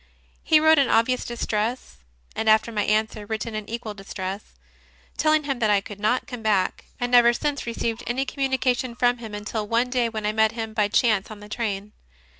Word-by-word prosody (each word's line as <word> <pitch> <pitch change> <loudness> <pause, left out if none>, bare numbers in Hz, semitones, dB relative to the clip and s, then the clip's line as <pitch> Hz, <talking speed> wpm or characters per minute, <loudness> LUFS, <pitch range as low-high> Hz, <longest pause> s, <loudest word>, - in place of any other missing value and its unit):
He 315 - +4
wrote 315 0 +5
in 275 - +3
obvious 240 +3 +2
distress, 235 0 -3 0.4
and 220 0 0
after 220 +2 +4
my 210 -2 -1
answer, 215 0 0
written 220 +1 -4
in 215 -1 -5
equal 230 -2 -5
distress, 195 0 -7 0.6
telling 310 -1 +2
him 275 -3 -2
that 220 -3 +2
I 205 -1 +4
could 200 0 -10
not 220 +5 +1
come 245 -3 -7
back, 210 -4 0
I 245 - 0
never 240 -1 +5
since 285 +1 -2
received 230 0 -2
any 260 +3 0
communi 265 0 -1
cation 250 -1 0
from 245 0 +2
him 220 -3 -7
until 210 +1 -4
one 235 +3 +1
day 245 -2 +1
when 220 -2 -5
I 210 - +2
met 220 +1 +2
him 225 -1 -5
by 210 -2 +2
chance 210 -2 +2
in 215 -1 -9
the 205 - -11
train. 210 -2 -3
225 Hz, 205 wpm, -24 LUFS, 210-245 Hz, 0.6 s, wrote